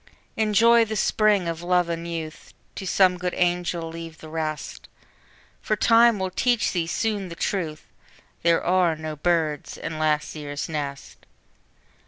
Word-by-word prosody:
Enjoy 225 +2 +4
the 220 -1 -4
Spring 210 -3 +2
of 165 0 -3
Love 180 0 +2
and 170 0 -4
Youth, 160 -2 -7 0.2
To 190 - -6
some 180 0 +3
good 180 0 -2
angel 175 -1 0
leave 165 0 -8
the 155 - -11
rest; 155 -1 -5 0.7
For 215 - 0
Time 230 +1 +5
will 190 -1 -2
teach 240 +4 +1
thee 170 -3 -1
soon 205 0 -2
the 170 - -8
truth, 165 -5 -3 0.6
There 170 0 +3
are 180 -2 +2
no 155 0 -6
birds 155 -2 -1
in 160 -1 -5
last 155 -1 0
year's 145 -1 -5
nest! 145 -3 -6
170 Hz, 150 wpm, -24 LUFS, 160-195 Hz, 0.7 s, Time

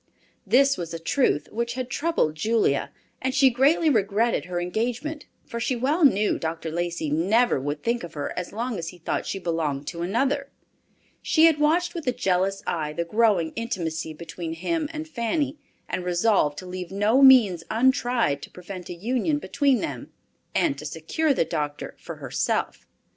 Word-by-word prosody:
This 275 +2 +4
was 170 -1 -5
a - - -5
truth 165 - +1
which 235 +2 -2
had 255 -1 -3
troubled 300 - 0
Julia, 210 -3 +1 0.3
and 260 0 -1
she 265 -1 +5
greatly 280 +7 +3
regretted 225 -2 +2
her 175 -1 -3
engagement, 245 - -3 0.2
for 235 - -5
she 245 +2 0
well 285 +8 +1
knew 210 -7 +4
Dr. 160 0 -4
Lacey 170 -2 -2
never 195 - +3
would 145 +2 -4
think 235 -2 0
of 170 - -9
her 145 - -3
as 180 -1 -4
long 230 -1 -3
as 165 - -5
he 180 - -8
thought 170 - -3
she - - -2
belonged 160 -6 -2
to 170 -1 -6
another. 275 +9 0 0.7
She 320 0 +4
had 320 -3 +4
watched 330 +4 +2
with 335 -5 -6
a - - +4
jealous 195 -2 0
eye 155 -3 -2
the 170 +2 -2
growing 205 -4 +2
intimacy 165 -8 -3
between 165 +1 -6
him 300 - -2
and 315 0 -6
Fanny, 285 +2 -2 0.3
and 180 - -3
resolved 175 -4 +2
to 185 - -7
leave 180 -1 -6
no 210 +7 +3
means 230 -11 +7
untried 240 - +2
to - - -9
prevent 180 0 -9
a 175 - -5
union 250 - 0
between 280 -5 +1
them, 130 -4 -5 0.4
and 140 - +1
to 150 - -8
secure 165 - -1
the 255 - +2
doctor 150 -3 -4
for - - -8
herself. - - -2
210 Hz, 175 wpm, -25 LUFS, 170-260 Hz, 0.7 s, means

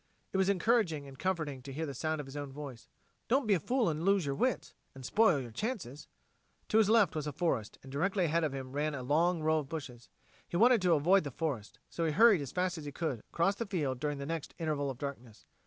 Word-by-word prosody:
It - - +1
was 190 0 +3
encouraging 185 -7 +1
and 135 -1 -12
comforting 155 -8 -2
to 135 +2 -9
hear 160 +4 -3
the 140 - -5
sound 155 +4 -2
of 145 - -5
his 135 +1 -11
own 145 -2 -5
voice: 135 -4 -9 0.4
"Don't 265 +2 +2
be 215 - +3
a 185 - +3
fool 245 - +1
and 160 -1 -1
lose 195 -2 +3
your 140 - -1
wits 255 - -1 0.2
and 130 -1 -9
spoil 200 - +4
your 120 -3 -7
chances." 170 - -4 0.6
To 220 - +4
his 215 -2 +4
left 220 -8 +4
was 150 -1 -2
a - - -2
forest, 130 -8 -1
and 135 - -11
directly 185 +6 +1
ahead 165 +1 +1
of 155 - 0
him 135 -1 -6
ran 145 +2 -1
a 130 - -5
long 160 +5 +2
row 155 0 +3
of 140 -3 -7
bushes. 130 -7 -7 0.4
He 170 - -1
wanted 235 +2 +5
to 180 -2 +4
avoid 175 +6 +4
the 145 - -4
forest, 135 -7 -4
so 170 - -4
he 160 -2 +1
hurried 215 -2 +6
as 140 - -5
fast 180 -2 -1
as 150 - -9
he 145 - -5
could 145 -5 -2
across 170 +4 +2
the 230 - -3
field 145 -10 -1
during 145 +1 -2
the 140 - -5
next 165 0 -4
interval 150 -4 -1
of 130 - -5
darkness. 125 -5 -7
155 Hz, 250 wpm, -32 LUFS, 140-185 Hz, 0.6 s, hurried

